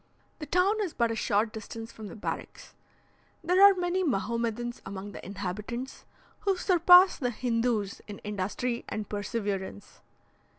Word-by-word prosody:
The 300 - -6
town 375 +7 +2
is 375 -6 -3
but 235 -1 +1
a - - -2
short 215 0 +1
distance 225 +1 -7
from 215 -1 -9
the - - -9
barracks. 215 - -6 0.7
There 360 +3 +3
are 400 -1 +9
many 360 +1 0
Mahomedans 235 - -2
among 195 +1 -7
the - - -10
inhabitants, 210 +7 -5 0.3
who 390 -2 0
surpass 360 0 +6
the 245 - 0
Hindoos 230 -3 -1
in 205 -1 -7
industry 210 +4 -2
and 215 -1 -4
perseverance. 205 - -4
230 Hz, 140 wpm, -29 LUFS, 205-330 Hz, 0.7 s, are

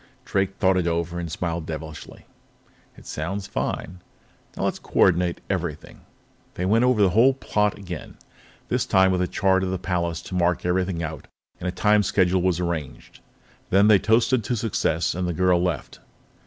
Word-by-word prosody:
Drake 95 0 -1
thought 95 -1 +2
it 90 -2 0
over 85 +1 -1
and 85 -2 -5
smiled 85 -1 -3
devilishly. 80 0 -8 0.7
"It - - -15
sounds 95 +6 -4
fine. 90 -2 -4 0.6
Now - - -3
let's - - -1
co - - -5
ordinate 90 -1 +3
everything." 85 -6 -4 0.5
They 90 - -2
went 115 +5 +3
over 125 -5 +3
the 95 - +3
whole 125 +7 +5
plot 105 -5 0
again, 90 -5 -8 0.5
this - - -1
time 95 0 +4
with 90 -1 0
a 90 - +1
chart 95 0 +1
of 95 - -1
the 95 - -1
palace 85 -2 -2
to - - -10
mark 90 -1 +1
everything 90 -1 0
out 80 -3 -6 0.3
and 90 - -4
a - - 0
time 105 +2 +3
schedule 95 -2 +2
was 90 -1 +1
arranged. 85 -6 -5 0.5
Then 100 +3 +5
they 105 -2 +6
toasted 115 +3 +2
to 125 - -1
success 100 -7 0
and 90 +1 -2
the 85 - -1
girl 90 0 +2
left. 90 -6 -3
90 Hz, 180 wpm, -24 LUFS, 85-100 Hz, 0.7 s, they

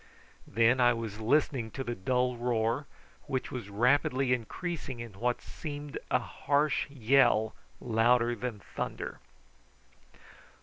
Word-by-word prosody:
Then 115 +4 +3
I 120 0 +6
was 110 -2 -5
listening 125 -1 +2
to 135 - -3
the 120 - -3
dull 125 +4 0
roar, 120 +3 0 0.4
which 130 -2 -2
was 120 -6 -5
rapidly 125 +4 +2
increasing 130 +2 -4
into 115 -5 -8
what 120 +1 0
seemed 145 -2 -6
a - - +4
harsh 145 +1 0
yell 120 -4 +3 0.3
louder 120 +1 +3
than 120 -2 -4
thunder. - - -5
125 Hz, 120 wpm, -30 LUFS, 115-135 Hz, 0.4 s, I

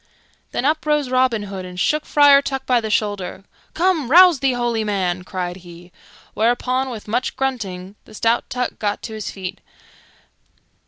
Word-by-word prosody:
Then 255 - -2
up 310 +2 +1
rose 295 -4 +1
Robin 255 -4 +2
Hood 195 -2 -6
and 180 0 -8
shook 300 +10 0
Friar 285 -1 +6
Tuck 270 -1 -4
by 245 -2 +2
the 220 - -4
shoulder. 205 -3 -2 0.3
"Come, 335 -7 +1
rouse 350 -1 +7
thee, 270 -1 +1
holy 240 -2 -1
man!" 185 -4 -1
cried 180 -1 -4
he; 175 -1 -14 0.4
whereupon, 250 +3 0
with 225 -4 -8
much 240 +4 -1
grunting, 200 -8 -3
the - - -14
stout 230 +2 0
Tuck 250 -1 -3
got 205 -1 -2
to 220 - -6
his 215 -1 -5
feet. 185 -2 -7
230 Hz, 165 wpm, -20 LUFS, 195-265 Hz, 0.4 s, rouse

